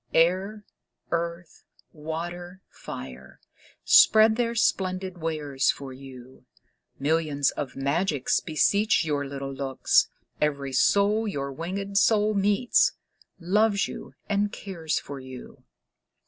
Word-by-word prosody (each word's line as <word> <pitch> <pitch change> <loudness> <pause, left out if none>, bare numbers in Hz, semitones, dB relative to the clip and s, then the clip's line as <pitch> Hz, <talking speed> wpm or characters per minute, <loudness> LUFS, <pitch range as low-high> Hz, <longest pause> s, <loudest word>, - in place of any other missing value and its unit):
Air, 190 +6 +2 0.5
earth, 170 0 -4 0.3
water, 175 +4 -6
fire, - - -10 0.5
spread 220 0 +6
their 235 0 -1
splendid 185 -4 0
wares 150 -4 -1
for 135 -2 -3
you. 130 -1 -13 0.5
Millions 150 -1 +1
of 135 -3 -6
magics 140 +1 0
beseech 200 +5 +2
your 145 -2 -1
little 135 0 -6
looks; 135 -1 +1 0.3
Every 140 -3 -1
soul 205 +9 +3
your 140 -8 -3
winged 195 +7 -2
soul 215 -1 +3
meets, 205 +4 +2 0.5
loves 200 +3 +2
you - - -9
and 205 0 0
cares 170 -6 -4
for 140 -1 -6
you. 130 -1 -11
170 Hz, 105 wpm, -26 LUFS, 140-200 Hz, 0.5 s, spread